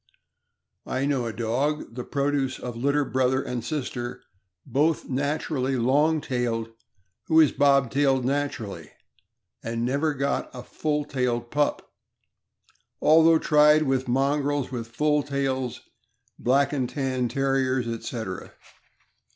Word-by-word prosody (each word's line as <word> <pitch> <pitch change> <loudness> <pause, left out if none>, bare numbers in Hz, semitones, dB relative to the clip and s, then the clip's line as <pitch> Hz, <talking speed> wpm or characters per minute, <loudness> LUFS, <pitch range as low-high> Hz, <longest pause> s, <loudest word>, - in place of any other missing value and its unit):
I 130 +1 -1
know 135 -4 0
a - - -3
dog, 120 +6 -2
the 125 +1 -5
produce 140 -1 -1
of 125 -2 -6
litter 140 +4 +1
brother 130 0 +1
and 125 -4 -4
sister, 125 -3 -4 0.4
both 155 +3 +1
naturally 140 0 -1
long 145 +6 +2
tailed, 120 -4 -2 0.6
who 160 0 +5
is 155 -3 +6
bobtailed 140 -1 +2
naturally, 115 - -3 0.7
and 115 +1 -3
never 145 +4 0
got 140 +1 -1
a 125 - -7
full 150 +2 -2
tailed 120 -4 -2
pup, 145 0 0 1.1
although 160 +1 +6
tried 150 0 +5
with 135 -2 0
mongrels 140 +2 0
with 120 -3 -4
full 150 +5 +1
tails, 135 -3 -2 0.6
Black 140 +4 +2
and 130 -4 -1
Tan 130 -3 -1
Terriers, 130 -1 0
etc... 115 -4 -5
135 Hz, 120 wpm, -25 LUFS, 125-145 Hz, 1.1 s, is